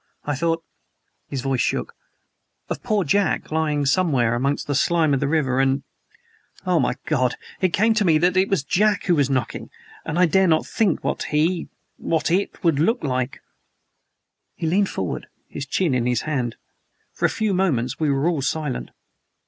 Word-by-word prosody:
I 145 Hz, -, -1 dB
thought" 165 Hz, +3 st, -1 dB, 0.6 s
his 135 Hz, -2 st, -4 dB
voice 135 Hz, -1 st, 0 dB
shook -, -, -1 dB, 0.8 s
"of -, -, -3 dB
poor 215 Hz, -5 st, +1 dB
Jack, 195 Hz, +3 st, 0 dB
lying 150 Hz, -2 st, 0 dB
somewhere 135 Hz, -7 st, +2 dB
amongst 135 Hz, +4 st, 0 dB
the 145 Hz, -, -2 dB
slime 160 Hz, +1 st, +2 dB
of 135 Hz, -, +2 dB
the 140 Hz, -, 0 dB
river 140 Hz, -4 st, +1 dB
and, 135 Hz, 0 st, +2 dB, 0.8 s
oh, 180 Hz, -2 st, +2 dB
my 125 Hz, -, +1 dB
God! 130 Hz, -6 st, +1 dB, 0.3 s
it 185 Hz, -2 st, +2 dB
came 220 Hz, +6 st, +3 dB
to 215 Hz, -1 st, +1 dB
me 165 Hz, -5 st, +4 dB
that 175 Hz, +3 st, +2 dB
it 190 Hz, +1 st, +3 dB
was 195 Hz, -8 st, +1 dB
Jack 205 Hz, +7 st, +2 dB
who 180 Hz, -, +2 dB
was 140 Hz, -4 st, +2 dB
knocking 130 Hz, -2 st, -2 dB, 0.3 s
and 160 Hz, +1 st, -3 dB
I 180 Hz, -, +6 dB
dare 190 Hz, +3 st, +3 dB
not 160 Hz, -2 st, +2 dB
think 205 Hz, -7 st, 0 dB
what -, -, -2 dB
he 165 Hz, +3 st, 0 dB, 0.3 s
what 160 Hz, 0 st, -1 dB
it 195 Hz, +3 st, -1 dB
would 165 Hz, -5 st, +2 dB
look 225 Hz, -, +1 dB
like!" 130 Hz, -2 st, -2 dB, 1.1 s
He -, -, -4 dB
leaned 190 Hz, +5 st, +2 dB
forward, 95 Hz, -3 st, -4 dB, 0.2 s
his 140 Hz, -, -6 dB
chin 165 Hz, 0 st, +1 dB
in 125 Hz, -1 st, +1 dB
his 125 Hz, -2 st, +1 dB
hand. 125 Hz, -7 st, -2 dB, 0.6 s
For -, -, -1 dB
a -, -, +4 dB
few 215 Hz, -2 st, -1 dB
moments 140 Hz, -11 st, 0 dB
we 155 Hz, -2 st, +1 dB
were 140 Hz, +3 st, +1 dB
all 165 Hz, -5 st, 0 dB
silent. 150 Hz, -1 st, -2 dB
155 Hz, 180 wpm, -22 LUFS, 135-180 Hz, 1.1 s, I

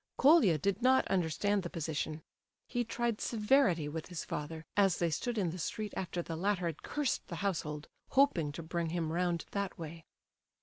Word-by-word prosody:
Colia 270 Hz, -, +6 dB
did 200 Hz, -, 0 dB
not 260 Hz, +1 st, +4 dB
understand 195 Hz, +3 st, +1 dB
the 175 Hz, -, -5 dB
position. 155 Hz, -1 st, -3 dB, 0.4 s
He 245 Hz, -1 st, 0 dB
tried 235 Hz, -1 st, -1 dB
severity 210 Hz, -, +3 dB
with 155 Hz, +1 st, -5 dB
his 175 Hz, -3 st, -5 dB
father, 160 Hz, +2 st, -5 dB
as 195 Hz, -4 st, +4 dB
they 170 Hz, -1 st, +1 dB
stood 235 Hz, +8 st, -2 dB
in 185 Hz, -5 st, +1 dB
the 180 Hz, -, -6 dB
street 210 Hz, +5 st, -3 dB
after 175 Hz, -1 st, -3 dB
the 165 Hz, -, -5 dB
latter 185 Hz, +1 st, 0 dB
had 165 Hz, -3 st, -3 dB
cursed 295 Hz, -4 st, -1 dB
the -, -, -5 dB
household, 150 Hz, -5 st, -2 dB, 0.2 s
hoping 225 Hz, -, +3 dB
to 165 Hz, -, -6 dB
bring 170 Hz, 0 st, -2 dB
him 165 Hz, -1 st, -1 dB
round 175 Hz, -1 st, 0 dB
that 200 Hz, -2 st, -2 dB
way. 165 Hz, 0 st, -8 dB
175 Hz, 180 wpm, -33 LUFS, 160-210 Hz, 0.4 s, Colia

